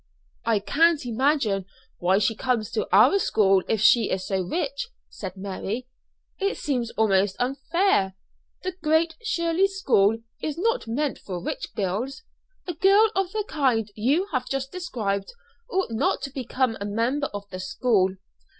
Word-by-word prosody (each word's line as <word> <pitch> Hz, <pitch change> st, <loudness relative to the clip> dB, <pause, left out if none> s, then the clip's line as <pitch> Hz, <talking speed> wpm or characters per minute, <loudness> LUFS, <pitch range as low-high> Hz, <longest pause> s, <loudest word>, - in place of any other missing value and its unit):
"I 225 Hz, -1 st, +3 dB
can't 310 Hz, +8 st, +2 dB
imagine 235 Hz, -6 st, +1 dB, 0.3 s
why 185 Hz, +2 st, +3 dB
she 215 Hz, +2 st, +2 dB
comes 235 Hz, -2 st, -1 dB
to -, -, -1 dB
our 395 Hz, -, +6 dB
school 195 Hz, -, +3 dB
if 220 Hz, -3 st, 0 dB
she 225 Hz, 0 st, +5 dB
is 185 Hz, 0 st, -2 dB
so 190 Hz, -2 st, 0 dB
rich," 280 Hz, -, -2 dB, 0.2 s
said 190 Hz, -2 st, -7 dB
Mary. 200 Hz, +5 st, -4 dB, 0.5 s
"It 395 Hz, 0 st, 0 dB
seems 250 Hz, -5 st, -1 dB
almost 195 Hz, -3 st, +3 dB
unfair. 270 Hz, -, +1 dB, 0.5 s
The 370 Hz, 0 st, -2 dB
Great 320 Hz, +1 st, +2 dB
Shirley 355 Hz, -4 st, +1 dB
School 225 Hz, -, +2 dB, 0.2 s
is 305 Hz, 0 st, -3 dB
not 460 Hz, -, 0 dB
meant 275 Hz, +5 st, -1 dB
for 180 Hz, -3 st, -5 dB
rich -, -, -5 dB
girls: 215 Hz, -, -2 dB, 0.4 s
a 350 Hz, -, -3 dB
girl 400 Hz, +6 st, +5 dB
of 380 Hz, -1 st, 0 dB
the 425 Hz, -1 st, -2 dB
kind 245 Hz, -8 st, +1 dB
you 270 Hz, -, +1 dB
have 255 Hz, -3 st, -1 dB
just 270 Hz, 0 st, -2 dB
described 215 Hz, -, -3 dB, 0.4 s
ought 380 Hz, -, -1 dB
not 225 Hz, +4 st, 0 dB
to 275 Hz, -, -4 dB
become 255 Hz, -2 st, -1 dB
a -, -, -2 dB
member 235 Hz, +8 st, 0 dB
of 205 Hz, 0 st, -8 dB
the 185 Hz, -, -6 dB
school." 190 Hz, -1 st, +1 dB
250 Hz, 155 wpm, -25 LUFS, 200-325 Hz, 0.5 s, our